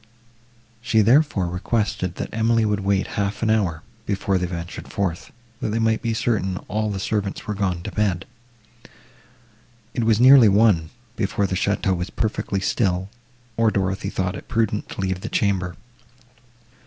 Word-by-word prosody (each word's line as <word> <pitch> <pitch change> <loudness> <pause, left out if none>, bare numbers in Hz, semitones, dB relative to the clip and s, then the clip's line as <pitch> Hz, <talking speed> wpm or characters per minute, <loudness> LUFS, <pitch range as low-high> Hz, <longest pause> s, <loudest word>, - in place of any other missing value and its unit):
She, 120 -3 +3
therefore, 120 - +3
requested, 90 0 -1
that - - -5
Emily 115 0 +2
would 105 -1 0
wait 100 0 +1 0.2
half 100 +2 -2
an 110 - +2
hour, 90 -8 0 0.2
before 100 -1 0
they 90 - -1
ventured 85 -1 -6
forth, 90 -4 -2 0.3
that - - -2
they 110 - -1
might 110 -1 +1
be 115 -1 -1
certain 95 -5 0
all 110 0 -1
the 100 -2 -3
servants 100 0 -2
were 105 - -2
gone 95 -4 -2
to - - -5
bed. 100 -5 0 1.7
It 120 - -1
was 110 -1 +3
nearly 130 -3 +8
one, 100 -6 +3 0.3
before 100 -1 0
the 95 - -2
château 100 0 +1
was 90 +1 -4
perfectly 105 -3 -2
still, 95 -2 0 0.5
or 115 -1 +4
Dorothée 95 -2 -1
thought 90 -1 -2
it - - -9
prudent 110 -2 -1
to - - -5
leave 95 -1 -2
the 110 - -5
chamber. 90 -4 0
100 Hz, 160 wpm, -22 LUFS, 95-110 Hz, 1.7 s, nearly